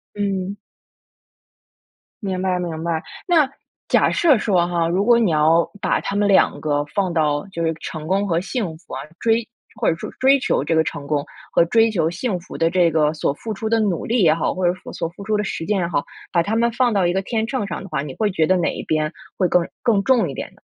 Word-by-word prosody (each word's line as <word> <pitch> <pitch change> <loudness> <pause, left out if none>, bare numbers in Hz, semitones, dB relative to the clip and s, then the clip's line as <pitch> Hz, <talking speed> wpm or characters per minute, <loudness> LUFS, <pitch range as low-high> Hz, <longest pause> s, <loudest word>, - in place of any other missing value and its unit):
嗯。 200 -1 -2 1.7
明 190 -2 -2
白， 185 -1 +1
明 165 -3 -4
白， 165 -1 -1 0.2
那 330 -7 +4 0.4
假 - - +4
设 315 -6 +4
说 185 -5 +2
哈， 170 -1 0
如 185 +4 +1
果 235 +1 +5
你 220 -6 +2
要 160 +2 +3
把 - - +1
它 200 - -3
们 205 0 +2
两 195 -1 +3
个 145 -1 0
放 190 +2 -1
到 150 0 0
就 170 - -3
是 165 - +1
成 155 -1 -6
功 195 +2 +1
和 170 -3 +1
幸 190 -4 -3
福 170 - -15
啊， - - -4 0.2
追 225 0 +2 0.3
或 - - +2
者 - - +3
说 - - -7
追 270 +2 +5
求 140 - 0
这 165 - 0
个 160 - +4
成 145 -2 -5
功 145 -1 0 0.3
和 - - +5
追 225 +5 +4
求 170 -6 +1
幸 190 +2 -2
福 170 - -10
的 165 0 +2
这 175 -1 +3
个 155 -1 +2
所 150 - 0
付 220 +8 -5
出 220 +2 -3
的 225 +1 +2
努 205 -6 0
力 235 -1 +1
也 155 -3 +5
好， 160 - -1
或 185 -1 -1
者 175 - +2 0.2
所 - - -3
付 180 - -12
出 215 +1 0
的 210 - -1
实 165 - -4
践 205 +3 0
也 175 - 0
好， 160 -4 -1 0.3
把 170 - +3
它 210 +6 -1
们 235 +1 +2
放 245 0 +2
到 195 -4 +2
一 175 - +2
个 190 +1 0
天 220 +2 -1
秤 225 -2 -2
上 - - -5
的 195 - -9
话， 150 -5 -2
你 140 -2 -7
会 215 -2 +1
觉 160 -3 +2
得 185 - +3
哪 175 - 0
一 - - -5
边 155 0 -1 0.3
会 185 - +3
更 180 - +3 0.2
更 220 -5 +3
重 225 -4 +3
一 135 - -6
点 - - -5
呢？ - - -24
185 Hz, 265 characters per minute, -21 LUFS, 165-215 Hz, 1.7 s, 果